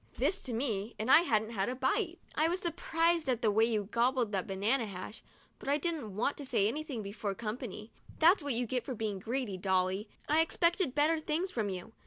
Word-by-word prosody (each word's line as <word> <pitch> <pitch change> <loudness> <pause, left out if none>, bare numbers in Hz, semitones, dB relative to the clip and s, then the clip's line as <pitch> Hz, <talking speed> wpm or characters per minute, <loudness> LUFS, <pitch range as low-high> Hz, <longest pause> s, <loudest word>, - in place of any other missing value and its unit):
This 390 - +1
to 250 - -3
me, 225 -3 -2
and 220 +4 0
I 320 - +9
hadn't 220 -9 +1
had 200 -1 -1
a 250 - -2
bite! 335 - 0 0.2
"I 310 - +2
was 355 +3 0
surprised 335 -2 0
at 245 -1 0
the 215 - +4
way 220 +2 +4
you 220 -3 0
gobbled 235 +2 +1
that 190 -3 -1
banana 215 +5 +1
hash, 195 +2 -8 0.4
but - - -5
I 285 - +4
didn't 300 - -3
want 255 +7 0
to 290 - -6
say 240 -7 +2
anything 270 -2 -3
before 200 0 -4
company. 220 -1 -6 0.3
That's 340 +4 +5
what 285 -2 -1
you 245 +1 +1
get 250 +1 -1
for 260 - -5
being 210 -3 -3
greedy, 230 -1 -3
Dolly! 190 +2 0 0.2
I 310 +2 +4
expected 335 -2 +1
better 310 +2 +3
things 315 +4 -1
from 215 -4 -1
you. 190 +4 -6
240 Hz, 215 wpm, -32 LUFS, 210-305 Hz, 0.4 s, I